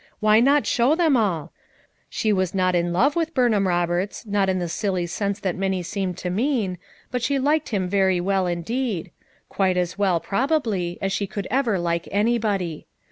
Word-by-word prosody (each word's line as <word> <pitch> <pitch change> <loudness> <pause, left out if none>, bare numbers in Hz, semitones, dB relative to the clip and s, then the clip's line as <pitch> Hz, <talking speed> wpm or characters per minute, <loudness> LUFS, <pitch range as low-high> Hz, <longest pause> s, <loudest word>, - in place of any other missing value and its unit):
Why 215 0 +5
not 280 +4 +4
show 250 +6 +3
them 325 -5 +3
all? 190 - 0 0.6
She 215 -1 0
was 185 -1 -1
not 185 -1 +2
in 175 0 +1
love 255 +12 +2
with 330 -1 -1
Burnham 220 -6 +3
Roberts, 175 +4 -1
not 200 -2 +1
in 185 - +1
the 175 -1 -2
silly 185 0 -1
sense 200 +3 -2
that 185 -3 -1
many 190 -1 -1
seemed 185 0 -3
to 180 - -4
mean, 210 - 0 0.3
but 250 0 -1
she 275 +4 +1
liked 295 +3 +1
him 195 -5 -1
very 190 -1 +2
well 190 0 0
indeed; 185 +3 -2 0.4
quite 190 -2 0
as 180 +2 -2
well, 190 -4 +2
probably, 210 - -1
as 195 - 0
she 200 +1 -1
could 200 0 -5
ever 245 -5 +1
like 170 -1 -1
anybody. 205 -6 0
195 Hz, 185 wpm, -23 LUFS, 180-235 Hz, 0.6 s, Why